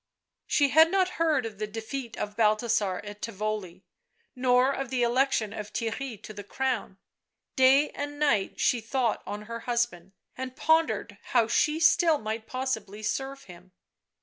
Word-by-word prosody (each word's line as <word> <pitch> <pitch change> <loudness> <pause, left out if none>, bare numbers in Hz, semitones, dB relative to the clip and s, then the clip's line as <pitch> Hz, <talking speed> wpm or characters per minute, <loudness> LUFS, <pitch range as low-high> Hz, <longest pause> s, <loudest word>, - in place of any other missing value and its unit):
She 285 -2 +3
had 320 +3 +6
not 375 0 +2
heard 305 -7 +2
of 210 -3 -7
the 215 - -2
defeat 225 +3 -6
of 205 0 -4
Balthasar 215 -3 +1
at 205 0 -9
Tivoli, 210 -4 -4 0.5
nor 250 +1 +3
of 270 -2 -4
the 255 -2 0
election 240 -3 +1
of 210 -2 -7
Theirry 230 0 -4
to 215 - -8
the 205 0 -8
crown; 245 -3 -2 0.6
day 265 +3 +5
and 290 0 -5
night 240 -10 +1
she 245 - +2
thought 235 0 -1
on 205 +1 -5
her 230 +2 -6
husband, 235 -7 -2 0.2
and 255 0 -6
pondered 320 -11 +1 0.2
how 230 -2 +4
she 300 +6 +2
might 320 +2 -2
still 305 - +3
possibly 220 -6 -4
serve 270 +5 -3
him. 180 0 -15
235 Hz, 155 wpm, -27 LUFS, 210-270 Hz, 0.6 s, had